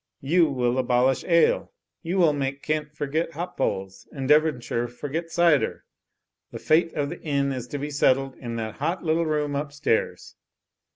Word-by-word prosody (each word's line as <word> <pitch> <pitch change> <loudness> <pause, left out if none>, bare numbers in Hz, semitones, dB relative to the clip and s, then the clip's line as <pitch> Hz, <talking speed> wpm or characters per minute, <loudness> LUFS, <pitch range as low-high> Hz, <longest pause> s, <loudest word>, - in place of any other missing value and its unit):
You 165 +3 +3
will 125 -2 0
abolish 125 +1 +2
ale! 170 -1 +3 0.3
You 175 +3 -2
will 165 -5 +4
make 140 -1 -3
Kent 155 -1 -2
forget 155 +4 -2
hop 175 +2 -5
poles, 95 0 -3
and 135 -2 -5
Devonshire 145 -6 +2
forget 145 +7 -5
cider! 170 -4 +2 0.6
The - - -7
fate 165 +1 +2
of 145 -1 -1
the - - -8
Inn 140 -2 0
is 125 -2 -5
to 145 - -5
be 145 +1 -4
settled 135 -1 +2
in 120 -2 -6
that 110 -2 -5
hot 165 +6 -2
little 165 0 +1
room 150 -2 -1
upstairs 145 -4 -2
145 Hz, 165 wpm, -25 LUFS, 130-160 Hz, 0.6 s, will